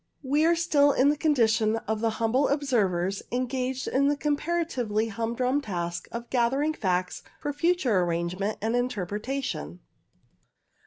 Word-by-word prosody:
We 290 +4 +2
are 340 - +4
still 290 -4 +3
in 270 +2 +4
the 295 - +2
condition 225 -8 +2
of 220 0 -1
the 225 +1 +1
humble 235 +5 +2
observers 200 - 0
engaged 255 +1 -2
in 280 +2 +2
the 290 0 +1
comparatively 285 -8 -1
humdrum 235 +5 -1
task 175 -7 -4
of 235 +1 -7
gathering 270 +5 +1
facts 185 -8 -1 0.2
for 290 - -3
future 290 - +2
arrangement 175 +4 -1
and 225 +1 0
interpre 210 -6 -1
tation. 230 - -4
245 Hz, 140 wpm, -27 LUFS, 210-285 Hz, 0.2 s, are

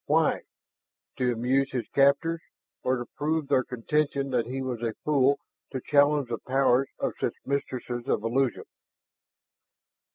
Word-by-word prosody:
Why? - - +3 0.8
To 125 -1 +2
amuse 130 +4 +1
his 125 -3 -2
captors, 140 +4 +3 0.4
or 130 +1 +1
to 120 - -4
prove 155 0 0
their 135 -2 +3
contention 140 +3 -1
that 120 -2 +1
he 130 +2 -3
was 125 -3 -3
a 115 -2 -2
fool 140 -2 +3 0.3
to 130 - -3
challenge 145 -1 +3
the 115 - -2
powers 135 0 +2
of - - -1
such - - -1
mistresses 125 -3 -3
of - - +1
illusion? 125 +2 0
135 Hz, 140 wpm, -27 LUFS, 125-140 Hz, 0.8 s, Why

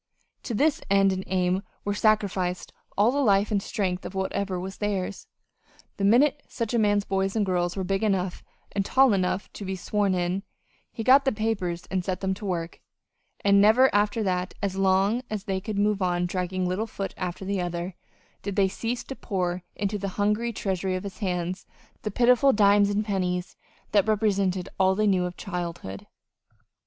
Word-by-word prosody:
To 235 - -4
this 295 +6 +2
end 195 0 +4
and 190 0 -3
aim 185 0 +1 0.2
were 205 - 0
sacrificed 200 -4 0 0.2
all 210 +4 +4
the 285 - 0
life 205 -4 +3
and 200 -2 +1
strength 190 -3 -2
of 195 - -7
whatever 190 -1 -2
was 190 +1 -6
theirs. 200 -2 -2 0.7
The 200 - -3
minute 265 +8 +4
such 230 -2 -4
a 235 - +3
man's 205 -1 +2
boys 195 +1 -1
and 215 -2 +2
girls 175 -2 0
were 190 - -1
big 195 +1 -1
enough 190 -4 0 0.3
and 200 - 0
tall 265 +3 +4
enough 185 0 -1
to - - -7
be 190 0 -3
"sworn 200 0 0
in" 180 +2 -1 0.5
he 225 - -5
got 265 +4 +6
the 270 - +2
papers 200 -6 -2
and 185 -1 0
set 185 0 -2
them 190 -1 0
to 205 +2 -8
work; 170 -2 -3 0.6
and 200 0 +6
never 235 +6 +5
after 205 +2 +2
that, 180 -2 -1
as 200 -2 -2
long 195 +4 +2
as 215 -3 -3
they 190 -2 -2
could 210 +1 -4
move 205 0 +2
one 180 -2 +1
dragging 180 0 -2
little 195 +5 -1
foot 195 -3 -5
after 185 +1 -4
the 195 -1 -1
other, 175 +1 -3 0.5
did 200 -2 -4
they 195 -2 +4
cease 230 +5 -3
to 270 - -7
pour 180 -6 -2
into 205 0 -2
the 195 0 -3
hungry 210 +3 +1
treasury 190 -3 -2
of 185 - -4
his 200 0 -8
hand 180 -2 -2 0.4
the 215 - -3
pitiful 250 +5 +4
dimes 205 -2 +4
and 205 +1 0
pennies 180 -3 -2 0.4
that 205 0 +3
represented 200 -4 +1
all 190 0 +4
they 215 +2 +1
knew 190 -3 +2
of 180 0 -6
childhood. 170 - -5
195 Hz, 190 wpm, -26 LUFS, 185-210 Hz, 0.7 s, got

